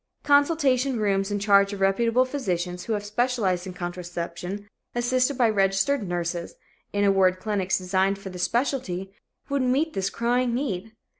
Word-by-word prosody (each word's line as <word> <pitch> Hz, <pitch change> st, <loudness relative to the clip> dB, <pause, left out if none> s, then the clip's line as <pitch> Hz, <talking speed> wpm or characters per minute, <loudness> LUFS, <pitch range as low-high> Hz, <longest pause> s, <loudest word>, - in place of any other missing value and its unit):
Consultation 285 Hz, -4 st, +3 dB
rooms 195 Hz, -1 st, +1 dB
in 205 Hz, -, -1 dB
charge 200 Hz, 0 st, +4 dB
of 200 Hz, -, -6 dB
reputable 230 Hz, +6 st, +3 dB
physicians 180 Hz, -10 st, -3 dB
who 230 Hz, -, -1 dB
have 205 Hz, -1 st, -2 dB
specialized 210 Hz, -5 st, 0 dB
in 185 Hz, -, -6 dB
contraception, 175 Hz, +2 st, -5 dB, 0.3 s
assisted 255 Hz, +2 st, +1 dB
by 240 Hz, -, +4 dB
registered 200 Hz, +4 st, +1 dB
nurses 175 Hz, -1 st, -3 dB, 0.4 s
in 205 Hz, 0 st, 0 dB
a 200 Hz, -, +5 dB
word, 185 Hz, -1 st, +3 dB
clinics 195 Hz, -2 st, 0 dB
designed 190 Hz, +1 st, +1 dB
for 195 Hz, -1 st, -8 dB
this 180 Hz, -1 st, -6 dB
specialty, 200 Hz, -5 st, -1 dB, 0.3 s
would 280 Hz, -1 st, 0 dB
meet 270 Hz, +6 st, +1 dB
this 195 Hz, 0 st, -1 dB
crying 240 Hz, +1 st, 0 dB
need. 225 Hz, -6 st, -3 dB
205 Hz, 155 wpm, -25 LUFS, 185-250 Hz, 0.4 s, a